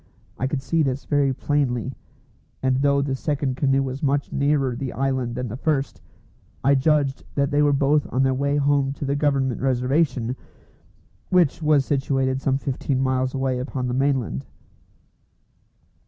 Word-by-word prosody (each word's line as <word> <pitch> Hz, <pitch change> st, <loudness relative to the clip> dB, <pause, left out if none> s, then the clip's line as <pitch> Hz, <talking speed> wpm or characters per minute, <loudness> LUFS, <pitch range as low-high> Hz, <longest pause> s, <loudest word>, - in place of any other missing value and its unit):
I 130 Hz, -, 0 dB
could 135 Hz, -1 st, -3 dB
see 160 Hz, +5 st, +1 dB
this 135 Hz, -2 st, -1 dB
very 145 Hz, -2 st, +2 dB
plainly; 130 Hz, -2 st, -1 dB, 0.7 s
and 130 Hz, -1 st, +2 dB
though 140 Hz, 0 st, +2 dB
the 135 Hz, -1 st, -2 dB
second 140 Hz, -1 st, -1 dB
canoe 135 Hz, 0 st, +2 dB
was 135 Hz, 0 st, -5 dB
much 140 Hz, 0 st, 0 dB
nearer 140 Hz, -3 st, +1 dB
the 130 Hz, 0 st, -4 dB
island 130 Hz, -3 st, -1 dB
than 125 Hz, 0 st, -3 dB
the 115 Hz, -, -5 dB
first, 140 Hz, 0 st, -1 dB, 0.6 s
I 140 Hz, -, +4 dB
judged 140 Hz, 0 st, +1 dB
that 140 Hz, -1 st, +1 dB
they 145 Hz, +1 st, +3 dB
were 145 Hz, -1 st, +4 dB
both 140 Hz, +1 st, +2 dB
on 130 Hz, -, +2 dB
their 135 Hz, 0 st, +2 dB
way 140 Hz, +2 st, 0 dB
home 140 Hz, -1 st, +2 dB
to 140 Hz, -, -6 dB
the 140 Hz, +1 st, 0 dB
Government 140 Hz, -3 st, 0 dB
Reservation, 130 Hz, -1 st, +1 dB, 0.9 s
which 175 Hz, -4 st, +3 dB
was 150 Hz, -3 st, +3 dB
situated 135 Hz, -1 st, 0 dB
some 135 Hz, -1 st, +1 dB
fifteen 135 Hz, -1 st, -2 dB
miles 130 Hz, 0 st, 0 dB
away 130 Hz, -1 st, -1 dB
upon 130 Hz, 0 st, -3 dB
the 125 Hz, -, -2 dB
mainland. 130 Hz, -, 0 dB
135 Hz, 160 wpm, -23 LUFS, 130-145 Hz, 0.9 s, I